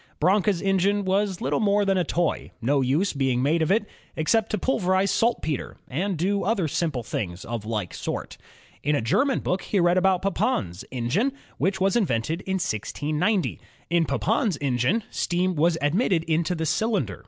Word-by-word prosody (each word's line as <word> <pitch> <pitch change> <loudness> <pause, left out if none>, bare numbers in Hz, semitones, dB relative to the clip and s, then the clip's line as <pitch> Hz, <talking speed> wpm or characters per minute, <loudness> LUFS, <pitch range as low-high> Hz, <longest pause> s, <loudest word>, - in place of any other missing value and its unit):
Branca's 190 +2 +2
engine 195 +1 +2
was 195 0 0
little 140 +2 0
more 205 -1 +2
than 195 -1 +2
a - - +2
toy, 170 0 -1
no 135 +4 +1
use 145 +10 +1
being 130 -3 0
made 160 +4 +2
of 160 - +1
it, 210 +1 +2 0.3
except 210 +8 +1
to 215 - -1
pulverize 190 -4 +1
saltpeter 225 - -1
and 180 +7 -2
do 200 +5 0
other 200 -6 +1
simple 150 -5 -1
things 90 -4 -4
of 115 -2 -5
like 105 -6 -3
sort. - - -4 0.5
In 150 +1 +1
a - - 0
German 265 - +2
book 180 +2 -1
he 200 - -1
read 175 +1 +4
about 190 -1 +2
Papin's 195 - -1
engine, 145 - 0 0.3
which 190 0 0
was 190 0 +2
in 225 -6 +3
vented 130 +8 -1
in 190 - 0
1690. 155 - -1 0.3
In 170 -1 +3
Papin's 200 - 0
engine 140 - +1
steam 180 +1 0
was 165 +1 +2
admitted 170 - +2
into 165 +2 0
the 160 -1 -2
cylinder. 175 - 0
175 Hz, 175 wpm, -25 LUFS, 145-200 Hz, 0.5 s, read